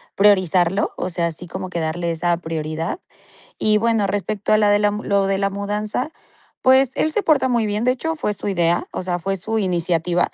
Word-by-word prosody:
priorizarlo, 190 -2 +3
o 185 - -3
sea, 170 -1 -1
así 165 +2 -7
como 185 +2 -6
que 170 -2 -3
darle 170 +2 -2
esa 170 +1 0
prioridad, 160 - -4 0.6
y 215 0 +3
bueno, 225 -2 +1
respecto 205 +1 -1
a 215 - +5
la 210 -1 +3
de 205 0 +4
la 205 0 +3
lo 200 -1 0
de 195 0 0
la 195 0 +1
mudanza, 210 +6 -3 0.5
pues 260 0 +5
él 310 +2 +1
se 425 - +1
porta 305 -7 +3
muy 235 -3 +1
bien, 210 +2 -1
de 250 - +4
hecho 320 +6 -3
fue 255 -9 -1
su 205 - -4
idea, 175 -3 +1
o - - -4
sea, 180 -1 -2
fue 195 +3 -2
su 220 +4 -2
iniciativa. 175 -2 0
195 Hz, 210 wpm, -21 LUFS, 175-215 Hz, 0.6 s, a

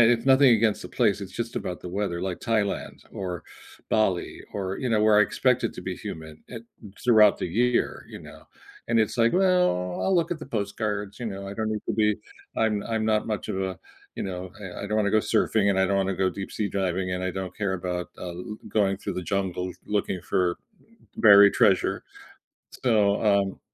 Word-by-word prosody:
it's 115 0 +1
nothing 135 0 +6
against 110 -2 +2
the - - -8
place, 105 -5 +1
it's 95 -1 -8
just 115 0 -4
about 90 - -4
the - - -7
weather, 90 -2 -2
like 90 -2 -3
Thailand 110 -4 -2
or 90 -3 -5 0.5
Bali 95 -5 0
or, 95 -1 -3
you 130 - -2
know, 110 -2 +2
where 105 -1 +5
I - - +7
expect - - +1
it - - -1
to - - -8
be - - -4
humid, 80 -1 -8
eh, 120 - -6 0.5
throughout 110 -4 +6
the - - -2
year, 120 +7 0
you - - -9
know? - - -13 0.5
And 115 0 +2
it's 110 +2 -1
like, 115 0 +4
well, 180 - +2
I'll 190 - +1
look 170 -1 +1
at 175 - -2
the 155 - -9
postcards, 105 -2 -3
you 120 - -3
know, 100 -2 -5
I 100 - -6
don't 110 0 -2
need 105 -1 -3
to - - +1
be 105 -1 +2 0.4
I'm 105 -2 +1
I'm 110 -1 -1
not 110 -1 +1
much 110 -2 -3
of 95 - -2
a 95 -1 -3 0.4
you - - -4
know, 90 -1 -5 0.3
I - - -5
I - - -4
don't 105 +1 -1
wanna 100 -2 +2
go 110 - +4
surfing 105 -1 +1
and 95 - +2
I 95 - +4
don't 100 - +1
wanna 95 0 0
go 95 0 +1
deep-sea 100 +2 -4
diving 95 -1 -1
and 90 0 -3
I 95 - -1
don't 95 -1 -5
care 100 -3 -1
about, 90 -1 -3
uh, 90 - -6
l 90 +5 -7
going 100 -3 +1
through - - -5
the - - -4
jungle 95 -2 -1
looking 100 -3 -2
for 90 -1 0 0.6
buried 100 -2 +8
treasure, 95 -3 +2 0.8
so, 105 -4 +3
um 100 -2 +2
100 Hz, 210 wpm, -26 LUFS, 95-110 Hz, 0.8 s, buried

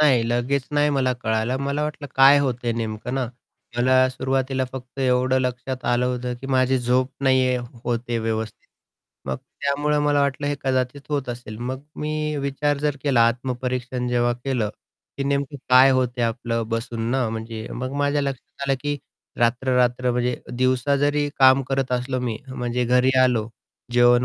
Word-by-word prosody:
नाही, 135 -6 +5
लगेच 125 +3 0
नाही 145 0 +3
मला 130 -3 +1
कळालं. 110 0 -1
मला 140 +2 -1
वाटलं 150 -1 -4
काय 135 +2 +7
होतंय 125 -3 -1
नेमकं 115 +1 -4
ना, 135 -1 0 0.5
मला 130 +1 +4
सुरुवातीला 130 0 -1
फक्त 130 0 -9
एवढं 130 0 +2
लक्षात 125 0 -3
आलं 125 +1 +2
होतं, 125 0 -2
की 135 - -7
माझी 130 0 +2
झोप 125 +2 +1
नाहीये 130 -1 +3 0.3
होते 120 0 -2
आहे 115 - +1
व्यवस्थित. 110 -1 -4 0.6
मग 65 - -1
त्यामुळं 145 - -1
मला 145 -1 +3
वाटलं 140 0 0
हे 145 - 0
कदाचित 130 +1 0
होत 140 -3 -2
असेल. 120 -3 -6
मग 130 +2 -4 0.2
मी 150 0 -2
विचार 140 +1 0
जर 145 -1 0
केला 130 -5 +4
आत्मपरीक्षण 125 0 -3
जेव्हा 120 0 +2
केलं, 120 -3 -2 0.5
की 140 - -2
नेमकं 140 0 -1
काय 130 +1 +8
होतंय 125 -2 +1
आपलं 115 0 -2
बसून 115 0 -2
ना, 130 -2 +1
म्हणजे 110 0 -5
मग 130 +2 -4
माझ्या 145 0 +1
लक्षात 140 0 -5
आलं 135 - +4
की 145 0 -1 0.4
रात्र-रात्र 125 +1 +2
म्हणजे 125 0 0 0.2
दिवसा 130 +2 +2
जरी 145 +1 +1
काम 130 0 +6
करत 135 -1 -1
असलो 125 +1 -1
मी, 120 -3 -2
म्हणजे 125 -1 -2
घरी 125 +2 +3
आलो, 120 -4 +2 0.4
जेवण 120 0 +5
130 Hz, 165 wpm, -23 LUFS, 120-135 Hz, 0.6 s, काय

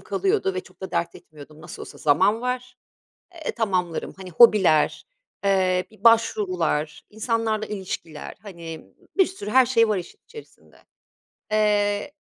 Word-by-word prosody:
kalıyordu 390 - 0
ve 185 - -2
çok 185 -1 -21
da 190 - -6
dert 170 0 -1
etmiyordum. 155 0 -14
Nasıl - - -9
olsa - - -11
zaman 190 +9 +3
var. 250 0 -4 0.6
Eee, 320 -3 -4
tamamlarım. 185 -7 -2
Hani 190 -1 -9
hobiler, 185 -6 +4 0.4
eee, 185 -2 +2
bir 215 -1 -21
başvurular, 185 -9 +2
insanlarla 220 0 -1
ilişkiler, 185 -6 -6
hani, 170 -6 -9 0.3
bir 380 - +5
sürü 290 - -7
her 260 +2 +5
şey 230 -2 +3
var 210 -2 +1
işin 175 - -9
içerisinde. 450 -1 -15 0.8
Eee, 210 +3 +1
205 Hz, 135 wpm, -24 LUFS, 180-230 Hz, 0.8 s, bir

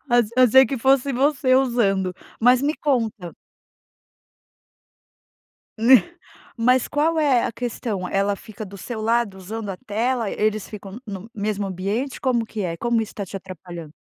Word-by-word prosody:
ach 240 -3 +3
achei 255 +1 +7
que 270 -3 -3
fosse 270 +2 +3
você 265 0 +2
usando, 200 -8 +2 0.3
mas 250 +3 +5
me 300 +2 +1
conta 225 - -1 2.4
Né. 240 +4 +6 0.6
Mas 250 +2 +2
qual 315 +2 +1
é 270 -5 +3
a - - -2
questão? 220 -6 -4
Ela 200 +1 +1
fica 215 +2 -9
do 200 - -11
seu 220 +3 -6
lado 225 -3 +1
usando 210 +3 -6
a 185 - -5
tela? 230 +1 -1
Eles 215 -1 -1
ficam 200 0 -9
no 195 -3 -6
no 225 - -14
mesmo 205 -1 -2
ambiente? 200 +9 -3
Como 245 -4 +1
que 220 -1 -5
é? 170 -3 -3
Como 235 +3 +1
isso 220 - -5
tá 200 - -4
te 195 - -7
atrapalhando? 175 -4 -9
225 Hz, 160 wpm, -22 LUFS, 195-255 Hz, 2.4 s, achei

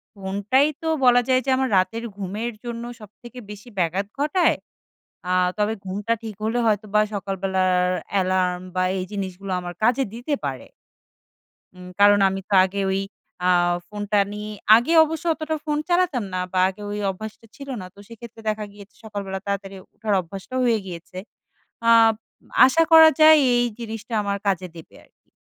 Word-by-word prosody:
ফোনটাই 200 +8 +1
তো 325 - -4 0.2
বলা 245 0 +6
যায় 255 -1 +3
যে 270 - -2
আমার 265 0 0
রাতের 225 +5 0
ঘুমের 205 +4 -4
জন্য 235 -1 -5 0.2
সবথেকে 240 +4 -13
বেশি 210 +3 -11
ব্যাঘাত 180 +3 0
ঘটায়, 320 +5 +2 0.7
আ - - +1 0.2
তবে 210 +1 +1
ঘুমটা 205 +4 -2
ঠিক 220 -2 -6
হলে 225 +3 0
হয়তো 215 -1 +1
বা 210 - +6
সকালবেলার 190 -2 0 0.3
অ্যালার্ম 185 -2 +1
বা 185 - +1 0.2
এই 185 - -3
জিনিসগুলো 195 -1 -5
আমার 175 -1 -7
কাজে 245 +4 +3
দিতে 245 +6 -4
পারে। - - -5 1.1
উম 180 0 -11
কারণ 205 0 +6
আমি 190 0 -4
তো - - -2
আগে 195 +1 -5
ওই 190 +1 0 0.4
আ - - +3 0.4
ফোনটা 205 0 -1
নিয়ে, 210 0 -6 0.2
আগে 240 +8 +1
অবশ্য 320 +2 -6
অতটা 315 0 -3
ফোন 300 -1 -1
চালাতাম 345 -9 +1
না 185 - -1
বা 185 - 0
আগে 190 +2 -11
ওই 210 - -4
অভ্যাসটা 220 +4 -8
ছিল 280 -2 -10
না। - - -8
তো 200 - -17
সেক্ষেত্রে 230 0 -12
দেখা 215 0 -3
গিয়েছে 205 0 -15
সকালবেলা 200 -3 -5
তাড়াতাড়ি 200 -1 -4 0.2
উঠার 215 -1 -2
অভ্যাসটা 195 +8 -9
হয়ে 235 -3 +2
গিয়েছে। 175 0 -9 0.7
আপ 225 -1 +6 0.5
আশা 295 +6 +4
করা 320 0 +9
যায় 310 0 +8 0.2
এই 240 0 +2
জিনিসটা 225 0 -7
আমার 200 0 -1
কাজে 185 -2 0
দেবে 165 - -13
আরকি। - - -32
210 Hz, 165 wpm, -23 LUFS, 195-240 Hz, 1.1 s, করা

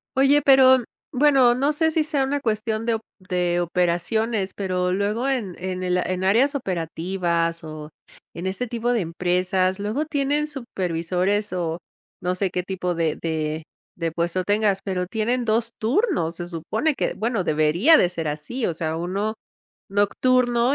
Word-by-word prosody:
Oye, 275 +2 +4
pero 260 -2 +6 0.3
bueno, 260 -3 +4
no 280 +4 +2
sé 320 +2 +2
si 315 -1 +1
sea 295 -3 0
una 280 +2 -1
cuestión 220 -2 -1
de 230 - +1
op 220 - -5 0.2
de 180 -2 -1
operaciones, 190 +4 0
pero 180 -2 -1
luego 210 +7 0
en 230 -10 -1
en 185 0 -4
el 180 0 0
en 185 +1 -1
áreas 235 +10 +3
operativas 170 - -2
o 155 -1 -8 0.5
en 170 - -6
este 195 +7 -2
tipo 235 +1 -1
de 235 - +1
empresas, 180 +2 0
luego 215 +10 -1
tienen 290 0 0
supervisores 190 - -2
o 170 -2 -2 0.4
no 180 0 -1
sé 185 0 -1
qué 180 - -1
tipo 180 -1 -3
de 165 -2 -1
de 160 -1 -2 0.3
de 165 -2 -2
puesto 170 +2 -1
tengas, 205 -1 +1
pero 180 -2 -2
tienen 235 +5 -1
2 230 +1 +1
turnos. 240 - +1
Se 175 - -5
supone 175 - -1
que - - -2
bueno, 225 -4 -1
debería 155 - +4
de - - +4
ser 170 -3 -4
así. 155 - -3
O 170 - -2
sea, 160 -1 -2
1 195 +6 -2 0.6
nocturno 240 +5 +2
195 Hz, 160 wpm, -23 LUFS, 175-245 Hz, 0.6 s, pero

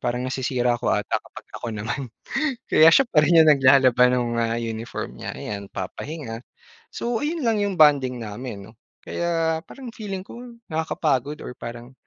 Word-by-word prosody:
Parang 125 0 -2
nasisira 125 -2 0
ko - - -1
ata - - 0
kapag - - -13
ako - - -5
naman. 105 +6 -3 0.7
Kaya 160 - +7
siya 270 - +6
pa 155 - +1
rin 165 +1 +6
yung 155 - +6
naglalaba 130 -2 +5
ng 125 -1 +1 0.2
mga 115 - +2 0.3
uniform 115 +2 -6
niya, - - -5
ayan 100 -1 -5
papahinga. 115 - -6 0.5
So, 235 -1 -2
ayun 310 -1 -2
lang 220 -2 +2
yung 200 -2 -1
bonding 140 -4 +5
namin 105 -1 -7
'no, 110 - -16 0.3
kaya 165 -2 -1
parang 255 -4 -9
feeling 195 -3 -5
ko 235 - -10 0.3
nakakapagod 150 -3 -1
or - - -6
parang 120 +2 -8
135 Hz, 165 wpm, -23 LUFS, 120-165 Hz, 0.7 s, Kaya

